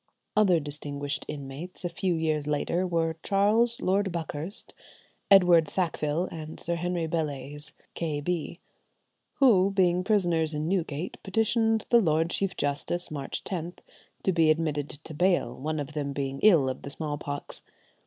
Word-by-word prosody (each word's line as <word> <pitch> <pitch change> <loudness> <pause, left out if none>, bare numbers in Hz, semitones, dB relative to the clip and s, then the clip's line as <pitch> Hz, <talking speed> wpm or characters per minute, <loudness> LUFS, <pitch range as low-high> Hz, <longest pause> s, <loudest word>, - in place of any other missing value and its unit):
Other 195 -5 +5
distinguished 145 0 -4
inmates, 145 +6 -7
a - - 0
few 175 +1 -1
years 155 -2 0
later, 170 +5 0
were 165 -2 0
Charles 215 +6 +2
Lord 195 +1 +1
Buckhurst, 165 +2 -4 0.6
Edward 180 -5 +7
Sackville, 165 -2 0
and 155 -1 -7
Sir 170 - -1
Henry 175 -1 -1
Bellayse, 150 -2 -3 0.2
K. 155 -3 -2
B., 170 +2 -3 0.8
who, 205 -9 +5
being 180 -2 +2
prisoners 175 -6 +2
in 150 +1 -2
Newgate, 170 -3 -2
petitioned 225 +2 +1
the 235 -1 +7
Lord 165 -2 +2
Chief 195 -1 -1
Justice, 145 +5 -1
March 140 -3 -3
10th, 175 -1 -4 0.5
to 190 - +3
be 165 -3 +3
admitted 155 -2 +1
to 155 +2 -7
bail, 175 -6 +2
one 155 +3 -3
of 145 +1 -5
them 145 -2 -2
being 135 -1 -3
ill 170 -11 +6
of 130 0 -3
the 140 - -7
smallpox. 145 -1 -4
165 Hz, 145 wpm, -28 LUFS, 150-185 Hz, 0.8 s, Edward